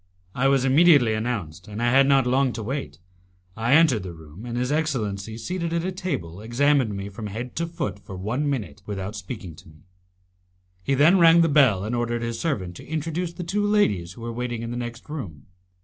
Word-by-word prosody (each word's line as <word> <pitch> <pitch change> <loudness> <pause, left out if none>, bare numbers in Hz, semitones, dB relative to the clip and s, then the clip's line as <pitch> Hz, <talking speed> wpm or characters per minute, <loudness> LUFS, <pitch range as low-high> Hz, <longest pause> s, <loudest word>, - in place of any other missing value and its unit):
I 130 +2 +1
was 135 -1 +3
immediately 140 -4 +5
announced, 105 -8 -3
and 105 +1 -7
I 120 0 +2
had 135 +1 +5
not 135 -2 +4
long 130 0 +2
to 110 - -5
wait. 105 - -4 0.6
I 115 +3 +1
entered 150 -9 +5
the 90 -2 -7
room, 80 +8 -11
and 120 0 -4
his 125 +2 -1
excellency, 110 -9 -2
seated 170 +5 -3
at 170 0 0
a 185 - -1
table, 105 - -4
examined 125 0 +2
me 100 0 -5
from 105 +2 -7
head 115 +5 -6
to 170 +1 -1
foot 155 - -4
for 95 - -10
one 120 +10 -1
minute 105 - -4
without 100 0 -4
speaking 95 -4 -7
to 90 - -15
me; 75 0 -19 1.0
he 135 +9 0
then 160 +8 +5
rang 170 0 +7
the 165 - +3
bell, 130 -10 +4
and 110 +4 -2
ordered 120 0 -1
his 115 -1 -3
servant 95 - -2
to - - -12
introduce 165 +3 -3
the 180 - -6
two 205 +5 -1
ladies 105 - +1
who 115 - -13
were 115 0 -5
waiting 120 -1 -3
in 115 - -5
the - - -4
next 120 0 -6
room. 100 - -7
120 Hz, 210 wpm, -24 LUFS, 100-150 Hz, 1.0 s, rang